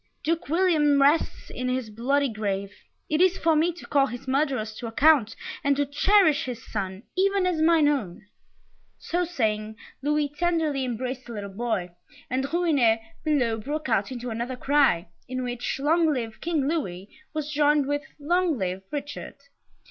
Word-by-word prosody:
Duke 330 -1 -1
William 315 -4 +3
rests 285 +4 +2
in 255 0 -3
his 255 -3 -2
bloody 275 +6 +1
grave! 200 -3 -3 0.3
It 310 +2 +1
is 370 0 +4
for 325 -1 +2
me 325 +3 +3
to 345 - -12
call 275 -2 +3
his 245 +1 -8
murderers 260 -5 0
to 240 - -5
account, 245 -1 +4 0.3
and 280 0 +3
to 285 +1 +1
cherish 315 +1 +3
his 240 -3 -6
son, 195 -1 -4
even 390 0 +2
as 350 -4 0
mine 320 -2 +5
own!" 215 -11 -1 0.7
So 355 +1 -1
saying, 220 -9 -1 0.3
Louis 295 +1 +1
tenderly 305 -3 0
embraced 250 +1 -4
the 235 - -7
little 200 -2 -6
boy, 200 -5 -2 0.4
and 260 +1 0
the - - -3
Rouennais 285 -9 +2 0.2
below 250 -8 +1
broke 295 +5 -4
out 215 0 +1
into 245 -1 -5
another 235 +3 -3
cry, 270 -11 +2 0.2
in 255 0 -3
which 245 0 -3
"Long 320 +3 +3
live 230 -5 -4
King 315 -5 0
Louis," 195 - -2 0.3
was 305 -1 -3
joined 295 -1 +3
with 290 +1 -1 0.2
"Long 345 +1 +1
live 185 -2 -2
Richard!" 290 0 -5
275 Hz, 165 wpm, -26 LUFS, 230-310 Hz, 0.7 s, mine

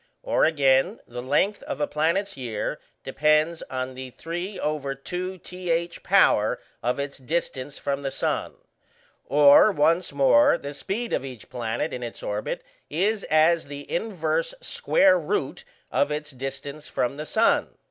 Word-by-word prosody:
Or, - - +3
again, 145 - +3
the 120 +1 -7
length 150 +11 +1
of 140 - -5
a 145 - +2
planet's 165 +8 0
year 120 -6 -3 0.2
depends 155 +3 +2
on 130 0 -3
the 130 0 -7
3/2th 175 +1 -3
power - - +4 0.2
of 125 +3 -1
its 140 0 -4
distance 140 -1 -3
from 140 0 -2
the 135 - -2
sun. - - -2 0.7
Or, 145 +8 +7
once 165 +1 +2
more, 135 -4 +5
the 140 +1 -7
speed 225 +10 -4
of - - 0
each 130 -5 -9
planet 120 +5 -2
in 125 - -4
its 120 -1 -7
orbit 105 +1 -3 0.3
is 200 +7 0
as 160 +2 +3
the 145 0 -8
inverse 225 - -1
square 190 - +3
root 155 -4 -2 0.3
of 145 +1 +1
its 150 0 -4
distance 135 +3 -6
from 125 +3 -1
the 150 - -5
sun. 225 +1 +2
150 Hz, 140 wpm, -25 LUFS, 135-175 Hz, 0.7 s, Or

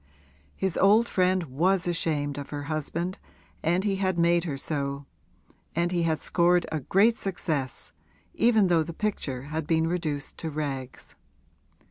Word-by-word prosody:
His 190 -3 -1
old 215 +4 +5
friend 185 0 +2
was 170 +6 +1
ashamed 150 -4 -1
of 140 - -7
her 145 -1 -5
husband, 160 +4 -3 0.4
and 175 +4 +1
he 200 -2 0
had 190 -2 0
made 170 0 +3
her 145 -5 -3
so, 140 -1 -3 0.7
and 170 +1 +1
he 175 -1 +1
had 160 -1 +1
scored 175 0 +2
a 160 - -1
great 205 - +3
success, 155 -8 -3 0.4
even 225 -3 +4
though 175 -3 +3
the 165 +2 -4
picture 140 -12 -2
had 150 +2 -4
been 160 0 +2
reduced 160 -4 -3
to 160 - -3
rags. 135 -4 -5
165 Hz, 150 wpm, -27 LUFS, 145-185 Hz, 0.7 s, old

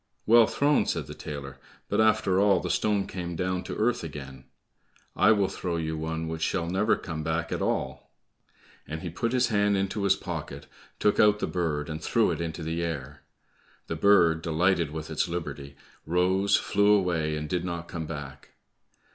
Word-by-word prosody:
"Well 115 0 +6
thrown," 145 +1 +2
said - - -1
the - - -8
tailor, 70 -2 -7 0.3
"but - - +1
after 105 -4 +3
all 100 -2 +4
the 90 - -3
stone 105 -2 +1
came 85 -2 -5
down 90 +1 -1
to - - -5
earth 115 -1 0
again; 70 -4 -8 0.7
I 105 - +5
will 100 -3 +3
throw 90 -2 -4
you 80 -1 -2
one 80 +1 -3
which 80 0 -5
shall 85 +1 0
never 95 +5 +2
come 80 -3 -6
back 80 +2 -2
at - - -2
all." - - -2 0.8
And 80 +2 -6
he 85 - -4
put 115 +7 -2
his 125 0 +2
hand 105 -2 +2
into 95 +2 -2
his 100 -1 +4
pocket, 75 -7 -6 0.3
took 105 - +2
out 105 0 +5
the - - -2
bird, 75 -5 -2
and 80 0 -6
threw - - +2
it - - -3
into 80 0 -4
the 80 +1 -2
air. 80 -6 -5 0.6
The 80 - -4
bird, 85 -2 +4
delighted 85 0 +1
with 80 +1 -6
its 80 - 0
liberty, 70 -5 -5 0.3
rose, 95 +4 +2
flew 105 +1 +3
away 85 -6 +1
and 75 0 -4
did 90 +2 -1
not 85 -1 -4
come 80 -2 -5
back. 75 -3 -8
85 Hz, 185 wpm, -27 LUFS, 80-100 Hz, 0.8 s, Well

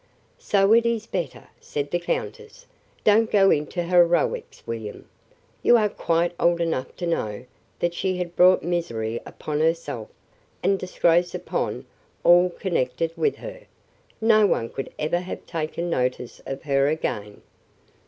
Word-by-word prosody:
"So 200 +1 +3
it 230 0 +6
is 230 -2 -1
better," 175 - -5
said 145 -1 -4
the 175 - +1
countess. 460 - -5 0.4
"Don't 220 +1 +4
go 195 -2 +5
into 155 +4 0
heroics, 175 -2 +2
William. 110 -2 -6 0.5
You 240 - +6
are 210 -2 +2
quite 170 -2 0
old 170 0 +3
enough 160 -6 -2
to 175 - -4
know 120 -9 -2 0.3
that 175 0 -1
she 185 +1 -1
had 175 -1 -4
brought 185 +1 +5
misery 115 -10 -2
upon 150 -1 -4
herself, 160 -8 -1 0.5
and 195 +1 +2
disgrace 175 -1 +1
upon - - -3 0.4
all 175 +1 +6
connected 165 -3 -1
with 435 - +1
her. - - -9 0.6
No 220 -2 +5
one 115 -10 0
could 135 - -6
ever 155 +3 0
have 180 +1 -7
taken 170 +1 -3
notice 125 -3 -2
of 135 +3 -5
her 140 -2 +2
again." 105 -9 -3
175 Hz, 145 wpm, -24 LUFS, 150-190 Hz, 0.6 s, it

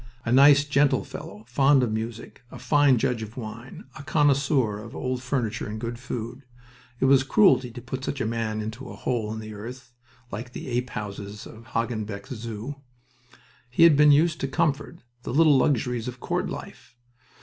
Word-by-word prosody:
A 120 - -1
nice, 140 +2 +7
gentle 145 0 +2
fellow, 105 - -9
fond 135 +1 +4
of 120 - 0
music, 110 +1 -5
a - - -10
fine 145 -3 +3
judge 115 0 0
of 110 +2 -8
wine, 115 +2 -8
a - - -8
connoisseur 140 -7 +2
of 115 +2 -10
old 130 -1 -3
furniture 125 -4 -2
and 110 +1 -5
good 115 +1 -5
food. 125 0 -6 0.6
It - - +2
was 135 0 +6
cruelty 135 - +4
to 120 +1 -9
put 130 +2 -5
such 140 - -3
a - - -1
man 110 -1 -2
into 115 +4 -6
a - - -8
hole 115 -4 -2
in 110 - -5
the 110 0 -8
earth, 125 +4 -9 0.4
like 120 +5 -6
the - - -7
ape 125 +1 -1
houses 105 -1 -7
of 115 +1 -13
Hagenbeck's 110 0 -3
Zoo. 115 +3 -6 0.9
He 125 +7 +3
had 165 -3 +8
been 150 +1 +6
used 155 +2 +3
to 135 - 0
comfort, 150 +1 -1 0.2
the 120 - -5
little 155 -2 +6
luxuries 125 -3 0
of 125 0 -6
court - - -2
life. - - -9
125 Hz, 180 wpm, -25 LUFS, 110-140 Hz, 0.9 s, had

